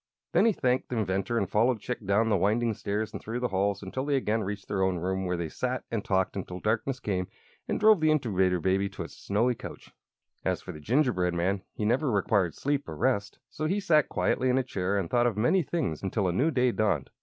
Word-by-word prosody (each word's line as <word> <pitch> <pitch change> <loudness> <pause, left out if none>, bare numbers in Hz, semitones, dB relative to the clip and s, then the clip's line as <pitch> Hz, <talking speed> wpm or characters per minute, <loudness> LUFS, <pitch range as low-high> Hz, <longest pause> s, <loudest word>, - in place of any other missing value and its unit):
Then - - +4
he - - +5
thanked 130 -9 0
the 125 - -2
inventor 100 +2 0
and - - +1
followed 115 +2 +2
Chick 120 +2 -5
down 110 +3 +3
the 105 - +3
winding 110 +5 +2
stairs 105 +1 -3
and - - -6
through 115 +3 -4
the 125 0 -1
halls 100 +1 0
until 115 +8 -4
they 145 0 +1
again 110 -4 0
reached 100 0 -5
their 95 -2 -1
own 95 -1 +1
room, 95 +2 -2
where 90 0 -1
they 85 -1 -2
sat 125 +9 -3
and 115 -3 -1
talked 95 -1 0
until 90 -2 -5
darkness 115 +6 -1
came 95 -7 -2 0.4
and - - -1
drove 215 -2 +6
the 155 - +4
Incubator 95 -11 +2
Baby 95 +3 +1
to - - -6
its - - -11
snowy 115 +5 +1
couch. - - -10 0.5
As - - 0
for - - -8
the 75 - -10
gingerbread 105 - +1
man, 95 +3 0
he 105 - -2
never 130 +6 +2
required 100 -4 +1
sleep 145 0 -1
or - - -5
rest; 110 -6 0
so 155 - -2
he 195 +5 0
sat 160 -7 +3
quietly 130 - +1
in 125 - +3
a 130 - +2
chair 100 -5 -1
and 95 -4 -1
thought 120 +5 +2
of 110 -4 -2
many 125 - +3
things 150 - -2
until 95 0 -1
a 90 - 0
new 135 - +2
day 125 -5 +2
dawned. 100 - 0
110 Hz, 235 wpm, -28 LUFS, 95-125 Hz, 0.5 s, drove